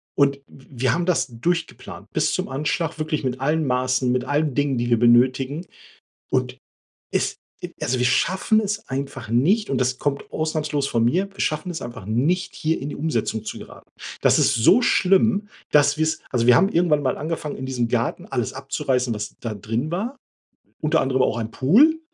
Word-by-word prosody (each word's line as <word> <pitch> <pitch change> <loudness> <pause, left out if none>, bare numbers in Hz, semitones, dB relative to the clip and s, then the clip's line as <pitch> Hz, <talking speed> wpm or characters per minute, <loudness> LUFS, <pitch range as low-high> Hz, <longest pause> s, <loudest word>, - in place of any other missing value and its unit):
Und 140 -1 +3
w 135 - -17 0.2
wir 130 - +3
haben 170 +1 -1
das 175 -7 +1
durchgeplant 140 +3 -4
bis - - +1
zum - - -2
Anschlag 155 +4 -2
wirklich 155 -1 -2
mit 130 -1 -2
allen 155 +3 +1
Maßen, 130 0 +1
mit 125 0 0
allen 145 0 0
Dingen, 145 -1 0
die 120 0 -1
wir 120 -2 +3
benötigen. 130 +6 +3 0.7
Und - - -1 0.6
es, - - 0 0.3
e - - -5
also 130 - 0
wir 125 - +1
schaffen 190 - +2
es 210 0 -4
einfach 135 -3 -5
nicht 180 - +2
und 135 - 0
das 125 0 0
kommt 140 0 -3
ausnahmslos 155 -3 -1
von 115 -4 0
mir, 180 +11 +1
wir - - -12
schaffen 155 +3 -1
es 165 - -5
einfach 120 -4 -8
nicht, 145 - 0
hier 160 +1 -1
in 140 - -4
die - - -6
Umsetzung 120 -7 -2
zu - - -6
geraten. - - -13 0.3
Das - - +4
ist - - +3
so 155 - +5
schlimm, 200 0 +3 0.2
dass 145 -1 +4
wir's 155 0 0
also, 120 -2 0
wir 125 0 +7
haben 190 +3 +4
irgendwann 165 -5 +2
mal 130 - 0
angefangen, 155 -1 -4
in 130 - -6
diesem 125 -3 -1
Garten 120 0 -1
alles 120 -4 -2
abzureißen, 130 -3 -1
was 105 0 -6
da 115 -3 -4
drin 115 +8 -3
war, 210 +10 -3 0.7
unter 155 +1 +2
anderem 130 -1 +1
auch 115 - +1
ein 110 -1 -4
Pool 275 - +4
140 Hz, 190 wpm, -22 LUFS, 125-160 Hz, 0.7 s, wir